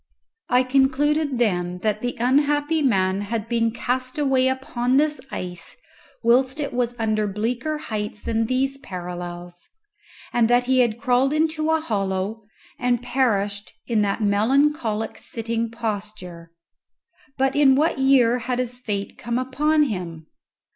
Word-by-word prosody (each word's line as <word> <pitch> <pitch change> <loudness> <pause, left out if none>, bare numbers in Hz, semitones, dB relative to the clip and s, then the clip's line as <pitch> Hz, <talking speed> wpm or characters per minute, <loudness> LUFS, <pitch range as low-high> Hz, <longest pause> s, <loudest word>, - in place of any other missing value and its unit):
I 250 +1 +4
concluded 275 +2 +2
then 180 -6 0
that 215 -1 0
the 245 0 -2
unhappy 290 +5 +2
man 195 -7 +2
had 215 +1 -3
been 230 -1 +1
cast 255 +4 -3
away 270 -3 +2
upon 260 -1 0
this 300 +1 +1
ice 180 -6 -7 0.5
whilst 260 +4 +3
it 285 - -3
was 245 -1 -1
under 215 -2 0
bleaker 240 +9 -2
heights 210 -7 -5
than 225 +1 -1
these 270 +2 0
parallels, 175 -4 -8 0.6
and 235 -1 +3
that 245 +1 +4
he 260 +1 +2
had 235 -3 +2
crawled 260 +2 +2
into 310 0 0
a 320 0 +3
hollow, 200 -5 -2 0.4
and 245 -1 0
perished 210 -6 0
in 225 -3 +1
that 205 +2 0
melancholic 225 +2 +1
sitting 230 0 -3
posture. 205 -7 -6 0.9
But 270 0 +1
in 280 -2 +5
what 300 0 +1
year 255 -3 +4
had 245 +1 -2
his 250 0 -2
fate 205 -5 -4
come 235 0 -2
upon 300 +4 +2
him? 175 - -4
240 Hz, 140 wpm, -23 LUFS, 210-265 Hz, 0.9 s, in